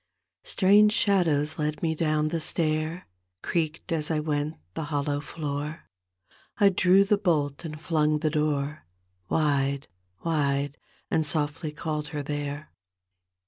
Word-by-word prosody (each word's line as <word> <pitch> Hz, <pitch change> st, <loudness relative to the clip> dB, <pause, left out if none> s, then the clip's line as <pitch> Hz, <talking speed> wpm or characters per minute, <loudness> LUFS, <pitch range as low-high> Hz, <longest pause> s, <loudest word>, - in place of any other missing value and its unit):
Strange 205 Hz, +2 st, +5 dB
shadows 160 Hz, -9 st, +2 dB
led 150 Hz, +1 st, -2 dB
me 160 Hz, -1 st, +2 dB
down 155 Hz, -1 st, +1 dB
the 165 Hz, 0 st, -2 dB
stair; 155 Hz, +2 st, 0 dB, 0.4 s
Creaked 165 Hz, +1 st, -2 dB
as 155 Hz, -2 st, 0 dB
I 160 Hz, -2 st, +1 dB
went 150 Hz, 0 st, -1 dB, 0.2 s
the 160 Hz, -, -3 dB
hollow 145 Hz, -1 st, -1 dB
floor; 150 Hz, +1 st, -5 dB, 0.7 s
I 205 Hz, -2 st, +6 dB
drew 185 Hz, +1 st, +5 dB
the 200 Hz, +1 st, +2 dB
bolt 150 Hz, -6 st, 0 dB
and 155 Hz, -2 st, -6 dB
flung 155 Hz, -2 st, +1 dB
the 155 Hz, 0 st, 0 dB
door 150 Hz, -, -1 dB, 0.4 s
Wide, 140 Hz, -3 st, +1 dB, 0.4 s
wide, 145 Hz, -3 st, 0 dB, 0.3 s
and 160 Hz, -, +2 dB
softly 150 Hz, +1 st, -1 dB
called 150 Hz, -1 st, -3 dB
her 150 Hz, -1 st, -4 dB
there. 145 Hz, +1 st, -4 dB
155 Hz, 130 wpm, -27 LUFS, 145-165 Hz, 0.7 s, I